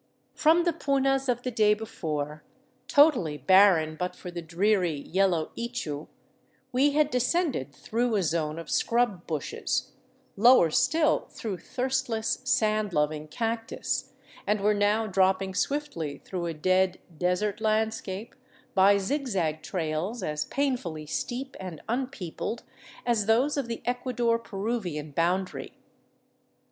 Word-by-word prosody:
From 325 +3 +4
the 345 -1 +1
punas 270 -3 +1
of 245 0 0
the 255 - -2
day 215 -2 +4
before, 150 -9 -4 0.4
totally 260 - +4
barren 165 0 +5
but 180 +3 -3
for 180 - -8
the 175 0 -5
dreary, 180 0 +1
yellow 180 0 +1
ichu, 235 -12 -4 0.6
we 275 +3 +3
had 300 0 +3
descended 250 - 0
through 230 - -1
a 200 - +2
zone 155 -1 -1
of 165 -2 -7
scrub 230 -7 +1
bushes, 155 -3 -2 0.4
lower 230 -6 +6
still 315 - +2
through 200 -6 -5
thirstless, 245 -1 -1
sand 215 -5 +1
loving 150 0 0
cactus, 225 +6 -3 0.3
and 210 0 +1
were 210 +1 +3
now 205 +2 +2
dropping 190 -1 +2
swiftly 185 - -2
through 175 -2 -3
a 165 - -2
dead, 185 +3 +2 0.2
desert 180 +5 0
landscape 220 -1 -1 0.4
by 200 +1 +6
zigzag 195 - -1
trails 175 +6 -3
as 150 0 -2
painfully 240 - -2
steep 255 - -4
and 180 -5 -7
unpeopled 235 -3 -3 0.4
as 230 -4 +1
those 250 +7 +3
of 280 -4 -2
the 230 -1 -5
Ecuador 245 -1 0
Peruvian 195 -9 -4
boundary. 180 +5 -1
205 Hz, 125 wpm, -27 LUFS, 170-245 Hz, 0.6 s, lower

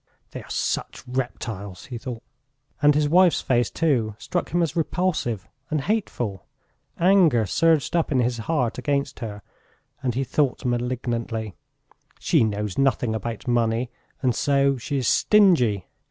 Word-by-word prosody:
"They - - -7
are - - -15
such - - -2
reptiles!" 110 -7 -5
he 120 -3 -7
thought. 120 -2 -7 0.6
And 145 0 +5
his 150 0 +2
wife's 180 +2 +4
face, 120 -3 +1
too, 125 -10 0
struck - - -3
him 175 +1 +1
as 160 - -2
repulsive 155 - -1 0.2
and 155 -2 0
hateful. 125 - -2 0.5
Anger 175 - +4
surged 165 - +2
up 165 -2 +1
in 135 - +2
his 120 -1 0
heart 125 -8 0
against 140 -2 -1
her, 105 -3 -6 0.6
and 125 -3 -1
he 135 - 0
thought 135 -1 0
malignantly: 120 -3 -2 0.6
"She - - +2
knows 105 -1 -2
nothing 130 -4 +2
about 115 +2 -5
money, 120 0 +1 0.3
and 125 -2 +3
so 140 +2 +2
she 140 +3 -3
is 130 - -1
stingy. 145 - +4
125 Hz, 145 wpm, -24 LUFS, 115-150 Hz, 0.6 s, And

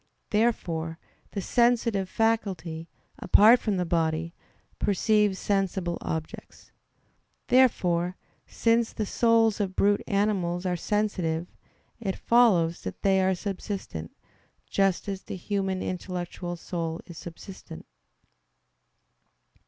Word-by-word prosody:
Therefore 170 -8 0 0.4
the 200 - -2
sensitive 230 -3 +2
faculty, 185 -8 -1 0.3
apart 225 +4 +6
from 210 -4 -1
the 180 - 0
body, 165 0 0 0.5
perceives 210 0 +2
sensible 190 -3 -1
objects. 160 -1 -6 0.8
Therefore, 180 -9 +3 0.3
since 230 0 +1
the 215 - -2
souls 225 0 +3
of 190 -2 -2
brute 205 0 +3
animals 190 -3 0
are 180 -1 0
sensitive, 175 -4 -1 0.5
it 195 -5 -2
follows 190 -9 +3
that 95 - -7
they 190 -1 +4
are 190 0 +2
subsistent; 190 - -5 0.5
just 195 -1 +1
as 195 -1 -4
the - - -7
human 190 0 -2
intellectual 180 -1 -4
soul 165 -1 -4
is 170 -1 -10
subsistent. 170 - -10
190 Hz, 105 wpm, -27 LUFS, 170-210 Hz, 0.8 s, apart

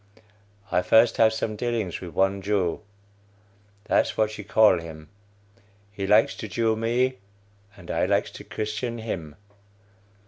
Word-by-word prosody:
I - - +2
first 110 +6 +4
have 110 -1 +5
some 110 -1 -3
dealings 115 -5 -3
with 85 -4 -9
one 95 +1 +1
Jew; 95 -3 -1 1.0
that's - - +1
what 110 0 +1
you 105 - -8
call 105 -2 +4
him. 80 -2 -10 0.8
He 100 -1 -4
likes 105 +2 +4
to 110 - -6
Jew 110 +3 0
me, 120 +3 0 0.6
and - - -9
I - - 0
likes - - +1
to - - -10
Christian 110 +3 -4
him. 85 -10 -6
105 Hz, 140 wpm, -25 LUFS, 95-115 Hz, 1.0 s, have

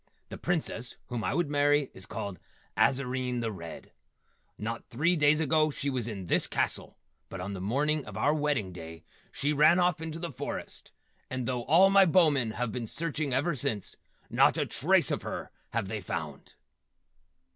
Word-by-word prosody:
The - - -7
Princess 155 -8 -2
whom 120 -2 -3
I - - 0
would 175 -1 +1
marry 145 -1 +3
is 95 +1 -11
called 100 -2 -5 0.4
Azarine, 130 -2 +1
the 115 -1 -2
Red. 85 -4 -9 0.7
Not 115 +2 -5
three 155 +9 +2
days 150 -1 +4
ago 155 0 +3
she 140 -1 -2
was 125 -4 -2
in 100 -5 -5
this - - +1
castle, - - -2 0.3
but 95 - -7
on 95 +3 -4
the 95 - -5
morning 145 +9 +1
of - - -8
our 150 - +3
wedding 145 -10 0
day 80 -2 -9 0.3
she 145 +2 0
ran 150 +4 +6
off 180 -3 +2
into 160 0 -4
the 170 0 -5
forest, - - -6 0.4
and 130 -2 -3
though 125 -2 -2
all 185 +6 +6
my 195 -1 +7
Bowmen 150 -10 +3
have 125 -1 -2
been 115 0 -4
searching 155 0 -2
ever 145 +7 +1
since, 110 -6 -3 0.3
not - - +4
a - - +1
trace - - +2
of - - -1
her - - -5 0.2
have 115 -4 -2
they 105 +1 -4
found!" 80 -5 -6
130 Hz, 180 wpm, -29 LUFS, 110-155 Hz, 0.7 s, my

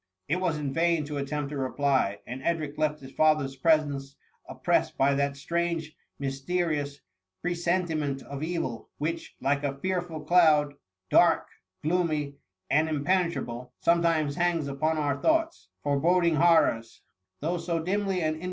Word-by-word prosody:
'' 95 - -55
It 165 - +1
was 180 -4 0
in 145 -2 -3
vain 165 -1 +2
to 145 0 -5
attempt 140 +1 -3
a 145 - -4
reply; 130 -5 0
and 125 +2 -6
Edric 155 -1 -1
left 150 -1 -1
his 135 0 -10
father'^s 145 -4 +2
presence 145 -4 +2 0.3
oppressed - - 0
by 140 +1 +3
that 140 0 0
strange, 170 +1 -2 0.2
mysterious 145 +1 -2 0.4
presentiment 170 -5 -1
of 140 0 -7
evil, 160 -8 -3
which, 165 +2 -4
like 140 +2 +1
a 140 -1 -2
fearful 175 -1 -3
cloud, 155 -4 +4 0.4
dark, - - +4 0.4
gloomj, 155 -4 0 0.4
and 155 +3 +3
impene 170 +4 +1
trable, 125 -4 -6
sometimes 165 -4 +2
hangs 170 -4 +1
upon 155 +3 0
our 145 -2 -1
thoughts, 325 +1 +1
foreboding 165 +3 +2
horrors; 155 -9 +3 0.4
though 170 +4 -1
so 170 0 -2
dimly 190 +1 -1
and 155 0 0
in. - - -11
155 Hz, 145 wpm, -27 LUFS, 140-170 Hz, 0.4 s, cloud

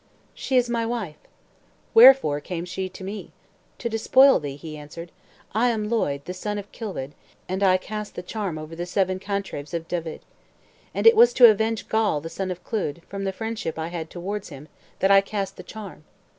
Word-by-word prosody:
"She 260 - -1
is 245 -1 +3
my 235 -1 -1
wife." 225 -10 -4 0.7
"Wherefore 235 - +7
came 170 +3 -5
she 185 +1 -4
to 185 - -11
me?" 200 +3 -7 0.4
"To 235 - -3
despoil 260 +4 +5
thee," 145 -2 -5
he 155 +2 -8
answered. 150 +3 -9 0.4
"I 235 +4 +3
am 215 -2 -1
Lloyd, 140 -11 0
the 180 - -5
son 205 +3 -4
of 205 0 -8
Kilwed, 185 - -6 0.4
and 185 +2 -3
I 185 -2 +5
cast 210 +2 -7
the 180 - -6
charm 195 -4 -4
over 155 +1 -8
the 175 +1 -5
seven 185 0 0
cantrevs 195 -6 -4
of 165 -1 -4
Dyved. 165 -2 -4 0.7
And - - -1
it 455 0 +9
was 470 +2 +6
to 240 -3 +9
avenge 220 -1 -1
Gawl, 220 -9 +1
the 165 +3 -7
son 190 +2 -4
of 180 -1 -6
Clud, 170 -7 -3
from 195 0 -5
the 195 - 0
friendship 220 -5 -4
I 160 +1 -3
had 165 -2 -5
towards 195 +3 -5
him, 140 +2 -11 0.3
that 195 - +4
I 195 0 +8
cast 200 -1 -4
the - - -9
charm. 200 -8 -10
195 Hz, 200 wpm, -24 LUFS, 165-220 Hz, 0.7 s, it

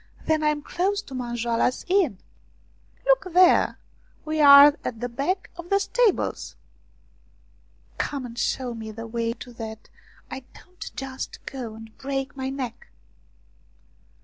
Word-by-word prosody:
" - - -23
Then 315 -1 +2
I 305 - +2
am 300 -1 0
close 395 +5 -1
to 270 - -12
Manjoala's 240 -1 -1
Inn." 360 - +2 0.5
" - - -34
Look - - +3
there; 360 0 +5 0.5
we 310 0 0
are 285 0 +10
at 230 - -4
the 245 - -2
back 280 +11 -2
of 345 0 -9
the 395 - +4
stables." 445 +1 0 0.8
" - - -34
Come 275 -3 -2
and 235 -1 -9
show 245 +1 -1
me 220 -1 -7
the 225 +1 -7
way 230 0 -2
so 245 - -10
that 220 -1 -8 0.4
I - - -4 0.2
don't 365 0 -10
just 265 -1 -6
go 240 -5 -6
and 220 0 -12
break 270 0 -3
my 265 -1 -3
neck." 265 -4 -6
270 Hz, 150 wpm, -25 LUFS, 235-325 Hz, 0.8 s, are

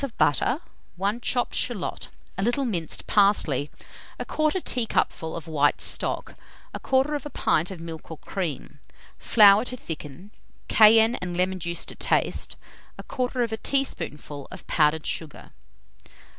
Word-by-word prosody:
of 270 -5 -5
butter, 245 - +2 0.4
1 200 +6 -1
chopped 245 0 0
shalot, 235 -7 -2 0.3
a 195 - -3
little 240 +6 +1
minced 175 -9 -2
parsley, 185 -9 +3 0.5
1/4 310 +4 0
teacupful 225 -8 -1
of 165 -2 -7
white 145 -2 +2
stock, - - -3 0.4
1/4 290 +2 0
pint 160 +3 +1
of 190 -3 -7
milk 165 -1 -8
or 160 - -7
cream, 155 -5 -5 0.4
flour 210 -1 +6
to 250 0 -4
thicken, 160 - -8 0.4
cayenne 225 +2 +6
and 175 -1 -5
lemon 185 +1 0
juice 170 0 -1
to - - -4
taste, - - 0 0.4
1/4 245 -3 -2
teaspoonful 150 - -2
of 185 - -11
powdered 155 0 +2
sugar. 160 -3 -5
195 Hz, 125 wpm, -25 LUFS, 160-245 Hz, 0.5 s, flour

